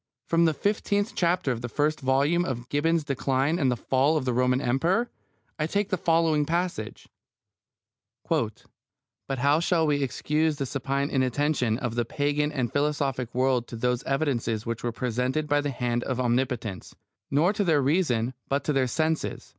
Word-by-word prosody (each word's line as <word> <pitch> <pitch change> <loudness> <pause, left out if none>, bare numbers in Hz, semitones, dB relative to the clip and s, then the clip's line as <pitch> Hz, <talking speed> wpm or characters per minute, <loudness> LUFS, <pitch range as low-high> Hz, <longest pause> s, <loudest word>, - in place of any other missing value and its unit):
From 170 0 +3
the 160 - +3
fifteenth 205 - 0
chapter 170 -5 +1
of 120 -2 -3
the 120 - -4
first 150 +5 0
volume 140 +6 +2
of 125 -6 -4
Gibbon's 160 +2 +1
Decline 140 +3 0
and 130 -5 +1
Fall 135 +7 +2
of 140 - -2
the 125 - 0
Roman 125 +1 +2
Empire 170 - +1 0.5
I 155 - +1
take 205 +3 -1
the 185 - +1
following 165 -3 +2
passage: 170 -8 -3 1.2
But - - -1 0.8
how 140 +4 +3
shall 170 -1 +2
we 145 -2 +1
excuse 150 +3 0
the 140 - -2
supine 140 +2 -2
inattention 130 -2 +1
of 120 -3 -3
the 120 0 0
Pagan 145 +4 0
and 130 -6 -2
philosophic 140 -4 -1
world 125 -2 +1
to - - -8
those 125 +2 0
evidences 125 -6 -1
which 115 -1 -4
were 120 - -1
presented 125 +5 -1
by 145 0 +2
the 145 - -2
hand 120 -2 -1
of 130 -2 -2
Omnipotence, 120 -5 -1 0.3
not 160 +8 +3
to 205 - +2
their 160 -6 +3
reason, 130 -6 +1 0.2
but 140 0 0
to 150 - 0
their 135 -2 +2
senses? 160 +5 -2
140 Hz, 170 wpm, -26 LUFS, 125-155 Hz, 1.2 s, From